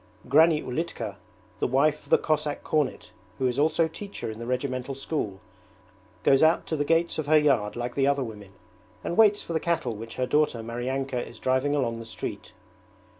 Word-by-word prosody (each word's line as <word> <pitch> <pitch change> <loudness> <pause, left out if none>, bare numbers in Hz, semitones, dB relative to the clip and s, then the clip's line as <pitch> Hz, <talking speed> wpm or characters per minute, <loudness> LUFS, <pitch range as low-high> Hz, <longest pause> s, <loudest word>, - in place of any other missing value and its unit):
Granny 155 +3 +5
Ulitka, 165 +7 -4 0.4
the - - +1
wife 145 +4 +2
of - - -20
the - - +6
Cossack 150 -1 -1
cornet 150 -3 -1 0.3
who 130 - -1
is 125 +1 0
also 160 +2 +3
teacher 195 - -6
in 110 - -9
the 115 - -6
regimental 130 +1 -2
school, 130 -8 -3 0.8
goes 135 - +5
out 160 +2 +4
to 160 - -2
the 145 - 0
gates 165 +2 +1
of 150 - -3
her 155 +1 +6
yard 135 -9 +2
like 120 0 -3
the 135 -1 +2
other 140 -1 +2
women, 105 -4 -9 0.5
and 170 - -2
waits 210 -1 +5
for 170 - -5
the 160 - +1
cattle 165 -8 -1
which 115 +2 -8
her 130 - 0
daughter 150 -4 +1
Maryanka 125 +2 -2
is - - -12
driving 130 +3 +1
along 115 -5 -1
the 115 - -8
street. 110 -1 -6
135 Hz, 190 wpm, -26 LUFS, 120-155 Hz, 0.8 s, the